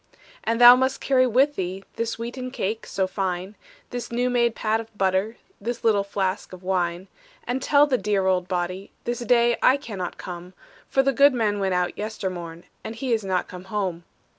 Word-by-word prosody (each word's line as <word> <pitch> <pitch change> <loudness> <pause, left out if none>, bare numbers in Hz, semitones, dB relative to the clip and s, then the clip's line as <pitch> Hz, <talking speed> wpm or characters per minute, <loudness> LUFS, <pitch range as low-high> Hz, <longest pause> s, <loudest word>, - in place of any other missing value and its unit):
"And 230 +1 0
thou 245 0 +11
must 260 +1 0
carry 255 -2 +3
with 270 +5 +3
thee 185 -1 -4
This 230 0 -2
wheaten 245 +2 -5
cake 220 -3 -3
so 195 -1 0
fine, 185 0 -3 0.4
This 245 -1 -5
new 245 +1 0
made 235 -2 +2
pat 220 0 0
of 225 -1 -10
butter, 190 +4 0 0.2
This 235 +3 -4
little 210 -3 +3
flask 195 -1 -3
of 185 0 -11
wine; 180 -1 -1 0.4
"And 250 +2 -2
tell 285 +2 +5
the 265 -4 0
dear 205 -2 0
old 185 -1 +1
body, 185 +1 -3
This 240 0 -2
day 240 0 +3
I 260 - +5
cannot 200 - -6
come, 180 +1 -8 0.3
For 270 - +3
the 275 0 +2
goodman 235 -6 +3
went 190 -2 0
out 180 0 0
yestermorn. 185 -6 -5 0.2
And 225 - -6
he 245 +1 -1
is 220 -2 0
not 185 -2 -1
come 180 0 -10
home. 190 -4 -3
210 Hz, 190 wpm, -24 LUFS, 185-240 Hz, 0.4 s, thou